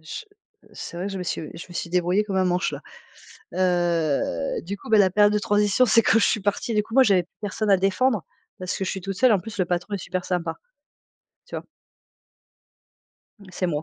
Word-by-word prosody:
Je 160 - -8 0.4
heu, - - -21
c'est 170 - -8
vrai 180 - -3
que 200 - -4
je 195 - -4
me - - -3
suis 180 - -3 0.2
je 165 - -9
me 175 - -12
suis 170 - -4
débrouillée 180 +3 +2
comme 200 -2 -3
un 190 - +3
manche 180 +1 0
là. - - -5 0.7
Heu, 170 - 0
du 200 +5 -5
coup, - - -12
bah 220 - +5
la 195 -2 +5
période 205 +2 +4
de 210 - +2
transition, 205 +4 +3
c'est 230 0 +5
quand 225 - +4
je 205 - +4
suis 215 - +1
partie. 205 +4 -1
Du 210 -1 +2
coup, 225 - -12
moi, 265 +1 +7
j'avais 195 -6 +3
plus 175 - -35
personne 210 +1 -2
à 195 - +6
défendre, 195 +2 +1 0.3
parce 185 +1 -3
que - - -2
je 185 - -2
suis 190 - -4
toute 195 +1 -4
seule. 250 +5 +4
En 205 - +4
plus, 220 +3 -9
le 185 - +1
patron 175 +3 -2
est - - 0
super 185 0 -4
sympa. 170 -3 -2 0.9
Tu - - -7
vois? - - -7 1.7
Mmh, 200 - -16
c'est 180 - -1
moi. 150 -3 -2
190 Hz, 240 wpm, -24 LUFS, 175-210 Hz, 1.7 s, moi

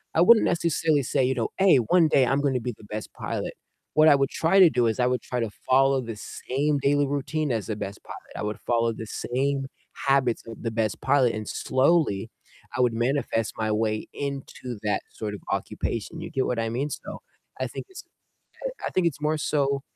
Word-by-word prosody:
I 165 - +4
wouldn't 220 +5 +7
necessarily 160 -3 +2
say, 135 +1 +1
you 130 +1 +2
know, 115 -2 0
"Hey, 190 -7 +6
one 160 +8 +4
day 135 - +4
I'm 140 +1 +2
gonna 135 -3 +1
be 120 0 -4
the - - -16
best 105 +1 -6
pilot," - - -4 0.4
what 155 +1 +6
I 145 - +7
would 135 0 +1
try 180 +4 +2
to 180 -3 +9
do 120 -5 +2
is 110 +3 -1
I 125 - +3
would 125 0 0
try 125 - -3
to 115 -2 -1 0.2
follow 135 0 +4
the 115 -2 -6
same 145 +7 -2
daily 145 +1 +2
routine 145 +2 -1
as 110 -3 -2
the 110 - -2
best 100 0 -6
pilot, - - -11
I - - -3
would 105 0 -3
follow 115 -1 +2
the 110 - -7
same 135 +3 -1 0.4
habits 135 -4 +2
of 115 - -9
the 115 - 0
best 110 -2 -1
pilot, 135 -3 +3
and 110 -1 -5
slowly 130 - +1 0.5
I - - +2
would 120 -2 +3
manifest 120 -2 0
my 110 -1 0
way 110 0 0
into 135 -4 -5
that 105 - 0
sort 105 -2 -4
of - - -9
occupation, 115 +8 -3
you - - -6
get 135 -4 0
what 120 -2 -1
I 115 - 0
mean? 130 +6 -2
So, - - -7 0.4
I - - 0
think - - -7
it's 380 - -10 0.8
I - - -2
think 185 -2 +2
it's 150 -4 -3
more 155 +1 +1
so 140 -2 0
130 Hz, 215 wpm, -26 LUFS, 115-145 Hz, 0.8 s, to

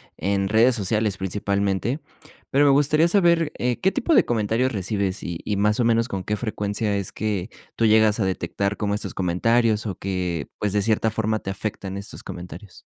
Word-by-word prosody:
en 100 0 0
redes 115 +5 +4
sociales, 105 -1 0
principalmente, 100 - -1 0.5
pero 145 +2 +4
me 140 - +6
gustaría 150 +3 +4
saber, 170 -4 +3
eh, 125 -1 -1
¿qué 190 - +3
tipo 275 +7 0
de - - +5
comentarios 115 +3 0
recibes?, 100 -1 -2
y 85 -1 -4
y, 105 - -1
¿más 105 +3 +2
o - - +3
menos, 115 0 +2
con 95 -5 -4
qué 105 - -1
frecuencia 105 -2 -2
es 100 -2 -3
que 105 -4 -3 0.3
tú 115 - +2
llegas 110 0 +4
a 105 - +1
detectar 100 +2 -2
como 100 -1 -1
estos 105 - -3
comentarios 110 +5 +1
o 95 - -3
que, 90 -5 -3
pues, 105 - -1
de 100 0 +1
cierta 110 +1 +2
forma, 110 0 -1
te - - -6
afectan 95 -1 -5
estos 100 - -8
comentarios? 90 +1 -10
105 Hz, 190 wpm, -23 LUFS, 100-115 Hz, 0.5 s, me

